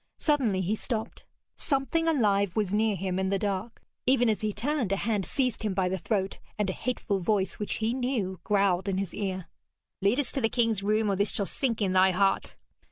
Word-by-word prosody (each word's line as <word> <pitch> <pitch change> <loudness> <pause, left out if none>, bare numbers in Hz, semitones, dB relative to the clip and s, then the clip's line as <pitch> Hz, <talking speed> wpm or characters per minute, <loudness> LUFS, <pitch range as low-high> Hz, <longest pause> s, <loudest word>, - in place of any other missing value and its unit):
Suddenly 255 - +1
he 190 +3 0
stopped. 220 0 -4 0.3
Something 280 +4 0
alive 200 - +2
was 205 -3 0
near 215 0 +2
him 185 0 -2
in 190 0 0
the 195 - +1
dark. 200 +3 -3 0.2
Even 250 -2 +4
as 215 - 0
he 215 -1 0
turned, 245 +1 -1
a - - +3
hand 205 -2 -1
seized 255 -4 0
him 210 -4 -1
by 185 -1 +1
the 190 - -1
throat, 195 -2 -1 0.2
and 205 -3 0
a - - -5
hateful 215 -5 -2
voice 190 +1 0
which 210 - -2
he 225 +1 0
knew 245 -8 -1
growled 200 -2 +2
in 190 - 0
his 195 -3 -2
ear: 190 -3 -3 0.6
'Lead 200 +7 +3
us 280 - -1
to 275 - -1
the 225 - +2
king's 230 -4 +1
room, 210 +1 +1
or - - +1
this 200 +1 +1
shall 200 - -1
sink 230 -1 -1
in 190 -2 +1
thy 190 0 +6
heart!' 195 +1 +1
205 Hz, 215 wpm, -28 LUFS, 190-230 Hz, 0.6 s, thy